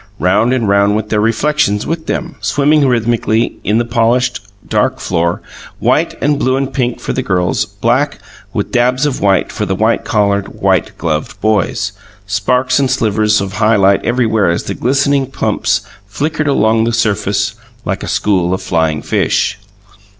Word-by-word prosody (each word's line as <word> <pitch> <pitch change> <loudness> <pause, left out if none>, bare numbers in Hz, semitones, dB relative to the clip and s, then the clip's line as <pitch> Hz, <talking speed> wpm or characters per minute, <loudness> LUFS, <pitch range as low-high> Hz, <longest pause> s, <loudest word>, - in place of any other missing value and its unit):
Round 105 +7 +2
and 125 -4 0
round 100 +1 +3
went 110 0 -2
their 105 -1 +1
reflections 115 -1 +1
with 160 0 -4
them, 170 -2 -3
swimming 145 0 +2
rhythmically 115 -2 0
in 105 +2 +1
the 120 - +1
polished, 120 +2 +1 0.3
dark - - 0
floor 85 -1 -1 0.3
white - - +1
and 145 0 +2
blue 130 -2 +1
and 135 0 -2
pink 125 -2 -1
for - - -3
the 130 - -1
girls; 90 -7 0
black, - - 0 0.3
with - - -3
dabs 125 +3 +2
of 145 -3 -2
white, 100 -1 +2
for 105 - -3
the 95 - -1
white 110 +3 +1
collared, 100 -3 0
white - - +1
gloved 80 -2 -3
boys; 105 0 0 0.3
and 105 - -15
sparks 125 +6 +1
and 135 -2 +1
slivers 110 -4 +1
of 100 -1 -4
high 110 +1 +3
light 100 -1 +3
everywhere 115 -4 +1
as 85 - -1
the - - -4
glistening 140 +1 +1
pumps 110 -4 0 0.3
flickered 150 +9 -2
along 110 -4 +2
the 115 - -1
surface 105 -2 0 0.3
like 95 - -2
a - - -5
school 95 -3 +1
of - - -7
flying 80 -3 0
fish. - - 0
110 Hz, 170 wpm, -14 LUFS, 100-130 Hz, 0.3 s, round